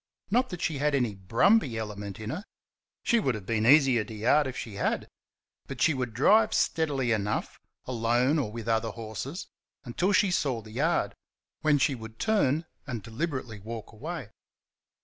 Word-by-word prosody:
Not 250 +4 +3
that 175 -2 -5
she 150 -4 -1
had 150 0 +2
any 125 -6 +1
brumby 120 - +2
element 105 -2 -5
in 110 +1 -4
her 180 +8 -4 0.6
she 235 - +3
would 130 - 0
have 105 -3 -7
been 110 +1 +1
easier 135 -5 +6
to 110 - -9
yard 130 +7 +3
if 130 - -5
she 110 - -6
had - - -1 0.6
but 135 -2 -7
she 160 +4 +4
would 125 -4 -3
drive 215 - +4
steadily 140 -7 +1
enough, 105 -2 -1 0.3
alone 125 +4 +2
or 125 -7 -2
with 115 0 -7
other 115 0 +1
horses, 115 - -6 0.4
until 175 +11 0
she 200 -1 +4
saw 135 -8 0
the 110 - -12
yard, 150 +9 +1 0.5
when 150 -1 +4
she 140 +1 +2
would 110 -2 -9
turn 165 -8 +1 0.2
and 120 -6 -4
deliberately 125 - -4
walk 110 +2 -7
away. 140 0 -6
125 Hz, 170 wpm, -28 LUFS, 110-155 Hz, 0.6 s, easier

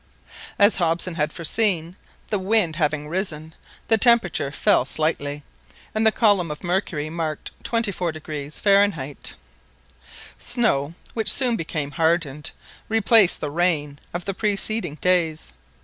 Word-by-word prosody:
As 205 -2 +5
Hobson 170 0 0
had 155 -1 -1
foreseen, 170 0 0 0.4
the 205 - +1
wind 190 -5 +1
having 150 -2 -1
risen, 160 -3 -4 0.3
the 225 -1 +3
temperature 205 - +3
fell 140 - +3
slightly, 145 0 -2 0.5
and 220 +1 +2
the - - +5
column 205 -7 +2
of 150 +3 -7
mercury 175 -4 -1
marked 160 -2 -4
24° 160 -10 -2
Fahrenheit. 195 -9 +1 1.0
Snow, 165 - 0 0.2
which 220 -2 +4
soon 250 -3 +3
became 155 -5 -4
hardened, 160 -3 0 0.4
replaced 220 -3 +4
the 150 - -3
rain 150 -4 0
of 175 0 -5
the 195 - -2
preceding 205 -4 -1
days. 165 - 0
170 Hz, 120 wpm, -22 LUFS, 150-205 Hz, 1.0 s, As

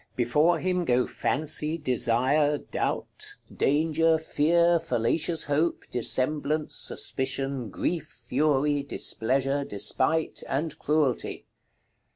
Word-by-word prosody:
Before 150 +8 +2
him 180 +1 -1
go 125 -4 +2
Fancy, 155 +2 0
Desire, 135 +2 +1
Doubt, - - -4 0.2
Danger, 160 +2 +2
Fear, 170 +2 +2
Fallacious 160 +3 0
Hope, 150 +4 0
Dissemblance, 150 +5 0
Suspicion, 135 -2 -2
Grief, 160 - -2 0.2
Fury, 145 +2 +1
Displeasure, 135 +1 0
Despite, 130 +9 0
and 150 +3 -2
Cruelty. 150 -4 0
145 Hz, 90 wpm, -26 LUFS, 130-160 Hz, 0.2 s, Before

